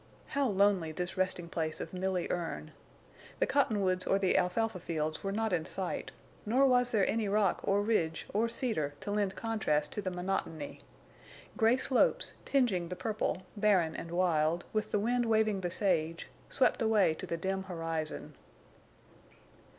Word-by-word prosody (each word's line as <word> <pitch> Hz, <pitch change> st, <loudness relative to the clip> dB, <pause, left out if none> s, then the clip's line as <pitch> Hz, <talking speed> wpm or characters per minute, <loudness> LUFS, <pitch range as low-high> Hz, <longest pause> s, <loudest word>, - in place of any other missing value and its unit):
How 280 Hz, -1 st, +1 dB
lonely 195 Hz, -5 st, +2 dB
this 175 Hz, +3 st, -4 dB
resting 185 Hz, -2 st, -1 dB
place 160 Hz, -2 st, -3 dB
of -, -, -6 dB
Milly 185 Hz, -1 st, -1 dB
Erne! 165 Hz, -3 st, -3 dB, 0.7 s
The -, -, +2 dB
cottonwoods 195 Hz, -9 st, +1 dB
or 195 Hz, -, +3 dB
the 190 Hz, -2 st, +2 dB
alfalfa 195 Hz, +2 st, +1 dB
fields 155 Hz, -2 st, -3 dB
were 195 Hz, -, -1 dB
not 220 Hz, 0 st, -1 dB
in 165 Hz, -3 st, +1 dB
sight, 190 Hz, +1 st, -3 dB, 0.3 s
nor 250 Hz, +6 st, +3 dB
was 250 Hz, -2 st, +4 dB
there 215 Hz, -5 st, +2 dB
any 220 Hz, -2 st, 0 dB
rock 200 Hz, -2 st, +2 dB
or 200 Hz, +1 st, +2 dB
ridge 175 Hz, -7 st, 0 dB
or 225 Hz, +3 st, +2 dB
cedar 215 Hz, -, -1 dB
to 205 Hz, -, -4 dB
lend 205 Hz, -2 st, 0 dB
contrast 150 Hz, -10 st, 0 dB
to 210 Hz, -, -3 dB
the 190 Hz, -, -2 dB
monotony. 180 Hz, -4 st, -3 dB, 0.7 s
Gray 230 Hz, +1 st, +4 dB
slopes, 265 Hz, -, +2 dB
tinging 225 Hz, -11 st, +2 dB
the 180 Hz, -, -4 dB
purple, 210 Hz, -3 st, -2 dB
barren 195 Hz, -6 st, +3 dB
and 165 Hz, -, -6 dB
wild, 170 Hz, -1 st, +1 dB
with 215 Hz, -1 st, 0 dB
the -, -, +2 dB
wind 240 Hz, +3 st, +1 dB
waving 220 Hz, -3 st, +2 dB
the 175 Hz, -, -1 dB
sage, 170 Hz, -4 st, 0 dB, 0.2 s
swept 260 Hz, -, +2 dB
away 215 Hz, -7 st, +4 dB
to -, -, -7 dB
the 170 Hz, -, -2 dB
dim 190 Hz, +2 st, -2 dB
horizon. 165 Hz, -3 st, -4 dB
190 Hz, 160 wpm, -32 LUFS, 170-220 Hz, 0.7 s, was